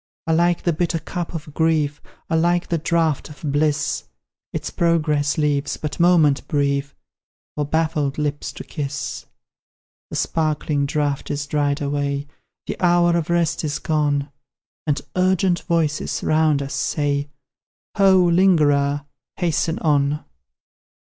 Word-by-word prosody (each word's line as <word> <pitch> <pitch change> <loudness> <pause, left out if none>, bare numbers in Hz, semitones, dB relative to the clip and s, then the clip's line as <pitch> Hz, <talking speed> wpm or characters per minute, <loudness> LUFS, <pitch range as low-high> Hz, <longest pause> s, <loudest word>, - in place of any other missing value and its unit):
Alike 170 +1 +2
the 170 - +2
bitter 170 +1 0
cup 175 +1 -5
of 155 -2 -7
grief, 155 -2 +1 0.3
Alike 170 +2 +1
the 170 - 0
draught 160 -2 0
of 150 0 -13
bliss, 150 0 0 0.5
Its - - -4
progress 150 -4 +1
leaves 145 -2 0
but 150 +1 -5
moment 165 -5 +4
brief 140 -1 0 0.6
For 150 - -1
baffled 155 -3 0
lips 145 -1 -2
to - - -8
kiss 140 -2 -5 0.8
The - - -6
sparkling 150 -2 0
draught 145 -2 -1
is 145 0 -2
dried 145 0 0
away, 140 0 -1 0.4
The - - -5
hour 175 -1 +4
of 170 -2 -1
rest 170 -2 +1
is 150 -1 -1
gone, 145 -2 0 0.6
And 145 -1 +1
urgent 185 -1 +2
voices, 160 -3 0
round 155 -2 +2
us, 140 - -6
say, 145 -1 -1 0.7
"Ho, 190 -2 +6
lingerer, 150 -6 +3 0.3
hasten 165 -2 0
on!" 145 -1 +1
150 Hz, 125 wpm, -21 LUFS, 145-170 Hz, 0.8 s, Ho